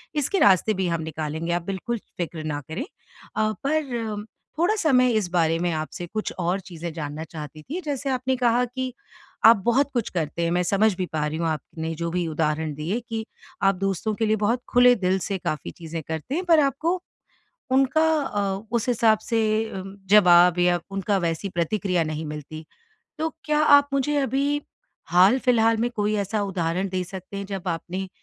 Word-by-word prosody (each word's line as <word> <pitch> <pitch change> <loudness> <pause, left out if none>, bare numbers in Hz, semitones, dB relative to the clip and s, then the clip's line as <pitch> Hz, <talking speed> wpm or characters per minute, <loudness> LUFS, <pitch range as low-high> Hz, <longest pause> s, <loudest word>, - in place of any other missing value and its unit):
इसके 295 +7 0
रास्ते 200 +2 +5
भी 190 -2 -1
हम 170 -1 -1
निकालेंगे, 160 +1 -4
आप 175 - 0
बिल्कुल 195 +6 -3 0.2
फिक्र 165 -2 -4
ना 145 -1 -3
करें। 230 - -3 0.5
अ, 215 0 +1
पर 240 -8 -1 0.3
थोड़ा-सा 350 -4 +2
मैं 250 0 +5
इस 215 -6 0
बारे 165 -2 +2
में 175 0 0
आपसे 160 +3 -4
कुछ 215 - -2
और 180 +3 0
चीज़ें 170 -2 -7
जानना 150 -1 -5
चाहती 155 -1 -9
थी। 340 +6 -5
जैसे 280 -3 -3
आपने 260 0 0
कहा 245 0 +2
कि 255 0 -4 0.5
आप 225 -1 +9
बहुत 270 +4 +3
कुछ 235 -3 -1
करते 170 -1 -2
हैं, 170 - 0
मैं 180 +1 +2
समझ 205 +3 +3
भी 185 - -1
पा 150 -1 0
रही 155 +1 -3
हूँ 170 - -1
आपने 160 +1 -4
जो 170 +1 -3
भी 175 -1 -1
उदाहरण 155 -1 -1
दिए 170 +10 -2
कि 225 -1 -3 0.4
आप 195 0 +4
दोस्तों 195 +3 -1
के 225 - 0
लिए 215 0 +2
बहुत 225 +4 0
खुले 245 0 +6
दिल 190 -2 +1
से 195 +1 -2
काफ़ी 155 -4 -4
चीज़ें 165 -1 -7
करते 160 - -4
हैं, 365 - -1
पर 330 -3 +5
आपको 320 +6 +1 0.7
उनका 270 +4 +3 0.2
अ, 200 -5 -2
उस 235 0 0
हिसाब 225 -2 +4
से 225 0 0 0.4
उम, 195 +1 -9
जवाब 180 -3 +6
या 175 0 +3
उनका 195 +1 0
वैसी 170 +2 -2
प्रतिक्रिया 180 +1 0
नहीं 155 0 -4
मिलती। 150 +1 -7 0.5
तो 320 +1 -1
क्या 300 0 +1 0.2
आप 285 0 -1
मुझे 290 +2 +1
अभी 280 +3 0 0.5
हाल-फ़िलहाल 225 +4 +4
में 240 +2 0
कोई 210 +1 +1
ऐसा 205 +1 -1
उदाहरण 185 0 -1
दे 185 -1 -2
सकते 185 +2 -8
हैं 200 0 -4
जब 195 -2 -5
आपने 180 +3 -3
195 Hz, 185 wpm, -24 LUFS, 170-240 Hz, 0.7 s, आप